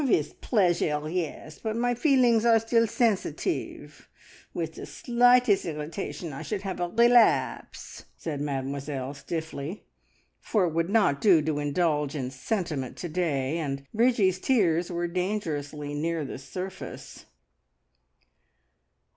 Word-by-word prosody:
"With 165 Hz, -, 0 dB
pleasure; 175 Hz, -, +1 dB
yes! 160 Hz, -2 st, -4 dB
but 220 Hz, -1 st, -2 dB
my 245 Hz, +1 st, +1 dB
feelings 245 Hz, -4 st, +3 dB
are 230 Hz, -1 st, +6 dB
still 230 Hz, +1 st, +2 dB
sensitive. 225 Hz, -2 st, -2 dB, 0.4 s
With -, -, -4 dB
the -, -, -8 dB
slightest 245 Hz, -3 st, +3 dB
irritation 160 Hz, +1 st, -5 dB
I 135 Hz, -, -6 dB
should 205 Hz, -3 st, -4 dB
have 190 Hz, -2 st, -4 dB
a 175 Hz, 0 st, -1 dB
relapse!" 235 Hz, +2 st, +2 dB
said 150 Hz, -4 st, -4 dB
Mademoiselle 140 Hz, -1 st, -3 dB
stiffly; 160 Hz, +4 st, -5 dB, 0.6 s
for 205 Hz, -5 st, +1 dB
it 165 Hz, -, -2 dB
would 165 Hz, +2 st, 0 dB
not 200 Hz, -10 st, +2 dB
do 185 Hz, -6 st, +6 dB
to 150 Hz, -1 st, -1 dB
indulge 150 Hz, -1 st, 0 dB
in 130 Hz, -3 st, -3 dB
sentiment 145 Hz, -, -3 dB
to 175 Hz, -, -5 dB
day, 155 Hz, -3 st, -1 dB
and 140 Hz, -3 st, -4 dB
Bridgie's 215 Hz, -5 st, +3 dB
tears 180 Hz, -9 st, +2 dB
were 175 Hz, 0 st, -1 dB
dangerously 160 Hz, -6 st, -3 dB
near 160 Hz, +1 st, -1 dB
the 135 Hz, -, -6 dB
surface. 185 Hz, +7 st, -8 dB
170 Hz, 125 wpm, -27 LUFS, 150-215 Hz, 0.6 s, are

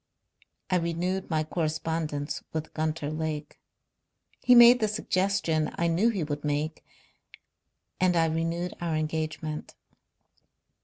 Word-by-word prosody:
I 185 Hz, -, +4 dB
renewed 175 Hz, +3 st, -2 dB
my 155 Hz, -2 st, +1 dB
correspondence 155 Hz, -2 st, -2 dB
with 155 Hz, -1 st, -4 dB
Gunter 155 Hz, -1 st, -2 dB
Lake. 155 Hz, -1 st, -4 dB, 0.8 s
He 250 Hz, -, +6 dB
made 240 Hz, +1 st, +9 dB
the 215 Hz, -, +2 dB
suggestion 190 Hz, -6 st, 0 dB
I 170 Hz, -, 0 dB
knew 170 Hz, +7 st, +3 dB
he 200 Hz, -7 st, -1 dB
would 145 Hz, -1 st, -4 dB
make, 150 Hz, +1 st, -2 dB, 1.2 s
and 185 Hz, -1 st, +3 dB
I 165 Hz, -1 st, +4 dB
renewed 165 Hz, +2 st, -1 dB
our 170 Hz, -2 st, -1 dB
engagement." 155 Hz, 0 st, -3 dB
160 Hz, 115 wpm, -28 LUFS, 155-180 Hz, 1.2 s, made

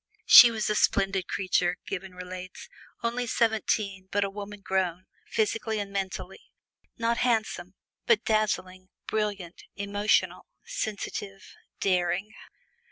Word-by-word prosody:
"She 240 Hz, -, +11 dB
was 220 Hz, -2 st, -2 dB
a 210 Hz, -, +1 dB
splendid 195 Hz, -2 st, +1 dB
creature," 180 Hz, -2 st, 0 dB
Gibbon 190 Hz, -1 st, -6 dB
relates; 180 Hz, 0 st, -8 dB, 0.4 s
"only 240 Hz, +1 st, -1 dB
seventeen, 215 Hz, -4 st, 0 dB
but 205 Hz, +1 st, +1 dB
a 195 Hz, -, -3 dB
woman 205 Hz, 0 st, -8 dB
grown, 185 Hz, -2 st, -1 dB, 0.2 s
physically 220 Hz, 0 st, -1 dB
and 200 Hz, -1 st, -4 dB
mentally; 190 Hz, -1 st, -5 dB, 0.5 s
not 230 Hz, 0 st, 0 dB
handsome, 220 Hz, -7 st, -1 dB, 0.3 s
but 230 Hz, -1 st, +3 dB
dazzling, 185 Hz, -4 st, -1 dB, 0.2 s
brilliant, 205 Hz, -5 st, -3 dB
emotional, 205 Hz, +1 st, 0 dB, 0.2 s
sensitive, 205 Hz, -, -5 dB, 0.3 s
daring!" 185 Hz, +2 st, 0 dB
200 Hz, 110 wpm, -27 LUFS, 185-215 Hz, 0.5 s, She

